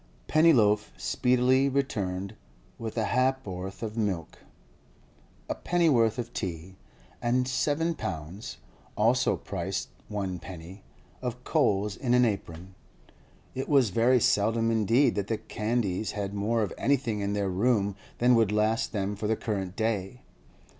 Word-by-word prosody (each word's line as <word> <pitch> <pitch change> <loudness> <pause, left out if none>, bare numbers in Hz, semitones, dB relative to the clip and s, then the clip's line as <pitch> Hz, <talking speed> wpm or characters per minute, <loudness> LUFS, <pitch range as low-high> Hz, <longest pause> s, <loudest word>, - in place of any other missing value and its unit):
Pennyloaf 115 -10 +4
speedily 130 +2 +2
returned 100 -9 -2 0.5
with 115 0 -5
a 110 - +1
ha'p'orth 100 -6 -1
of 110 -1 -4
milk, 100 -8 -2 1.1
a - - -1
pennyworth 140 -11 +2
of 120 -1 -5
tea, 90 -1 -5 0.5
and 125 +1 +1
seven 150 +6 0
pounds 90 - -6 0.4
(also 120 +4 +3
price - - -4 0.2
one 95 -4 -3
penny) 90 +2 -10 0.4
of 125 -1 -4
coals 105 -10 +1
in 125 0 +1
an 125 0 +5
apron. 95 -4 -4 0.8
It 130 - -4
was 135 -8 +4
very 120 +5 +4
seldom 115 +2 +2
indeed 115 +5 +3
that 100 -1 -2
the 110 - -1
Candys 110 -2 -2
had 100 -1 -3
more 110 +3 0
of 100 - -3
anything 125 -6 +1
in 100 0 -1
their 100 -2 -1
room 100 0 +1 0.2
than 125 +1 +4
would 115 -4 +3
last 110 +2 +1
them 100 -1 -1
for 105 +1 -3
the 110 - +2
current 95 -4 -3
day. 110 +1 -2
110 Hz, 135 wpm, -28 LUFS, 100-125 Hz, 1.1 s, an